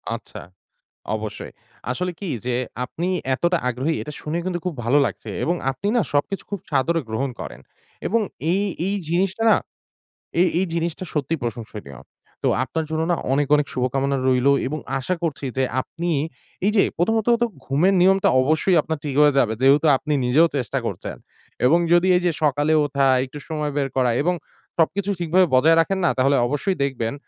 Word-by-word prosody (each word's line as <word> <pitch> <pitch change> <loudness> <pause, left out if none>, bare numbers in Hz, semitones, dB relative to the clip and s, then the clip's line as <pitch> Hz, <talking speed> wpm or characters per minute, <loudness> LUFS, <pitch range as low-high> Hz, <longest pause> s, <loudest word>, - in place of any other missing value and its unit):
আচ্ছা। - - -9 0.7
অবশ্যই। 110 -1 -6 0.4
আসলে 180 +8 -2
কি 200 - -5 0.2
যে, 125 - 0 0.3
আপনি 170 +7 -4 0.3
এতটা 175 +5 +1
আগ্রহী; 130 +6 -1
এটা 150 - -7
শুনে 155 +3 -3
কিন্তু 175 -2 -2
খুব 180 - -1
ভালো 135 +5 +3
লাগছে। - - -5
এবং 175 - +1 0.2
আপনি 135 +10 -5
না, - - +4
সবকিছু 165 +8 0
খুব 200 - -3
সাদরে 165 +5 +1
গ্রহণ 130 +5 -1
করেন। 60 - -8 0.5
এবং 230 +3 +2 0.3
এই, 195 +3 +2 0.3
এই 200 - 0
জিনিসটা 190 +5 0
না, - - +5 0.8
এই, 180 - +5
এই 190 - +1
জিনিসটা 170 +2 -2
সত্যিই 150 +2 -1
প্রশংসনীয়। 110 - -6 0.4
তো - - +2 0.2
আপনার 160 +4 -3
জন্য 160 0 -1
না, - - +3 0.2
অনেক, 145 0 +1
অনেক 145 -1 +1
শুভকামনা 135 +2 0
রইলো 130 +1 +4 0.2
এবং 155 +3 -3 0.2
আশা 180 +8 -1
করছি 145 -3 -2
যে, 130 - +2 0.2
আপনি 170 +5 -5 0.6
এই 210 - +3
যে 200 - +6 0.2
প্রথমত 220 +5 +1
তো 240 - +3 0.2
ঘুমের 160 +9 +2
নিয়মটা 195 +1 +4
অবশ্যই 155 +7 +2
আপনার 160 0 -3
ঠিক 145 -3 -3
হয়ে 145 -1 +5
যাবে। 115 -4 +3
যেহেতু 140 +4 +5
আপনি 150 +2 -3
নিজেও 150 +7 +5
চেষ্টা 125 -5 -2
করছেন। - - -4 0.5
এবং 160 +7 +5
যদি 175 +2 +4
এই 180 - +2
যে 175 - +3
সকালে 150 +1 +2
উঠা, 140 -1 +1 0.2
একটু 140 +3 -10
সময় 150 -2 -2
বের 140 -1 +1
করা 125 -2 +3
এবং 180 +4 +1 0.4
সবকিছু 190 +4 +1
ঠিকভাবে 175 +2 +3
বজায় 160 +6 +5
রাখেন 190 +3 -1
না? - - +4
তাহলে 135 +2 +3
অবশ্যই 150 +8 -1
দেখবেন, 120 -5 -2
155 Hz, 175 wpm, -22 LUFS, 135-180 Hz, 0.8 s, যে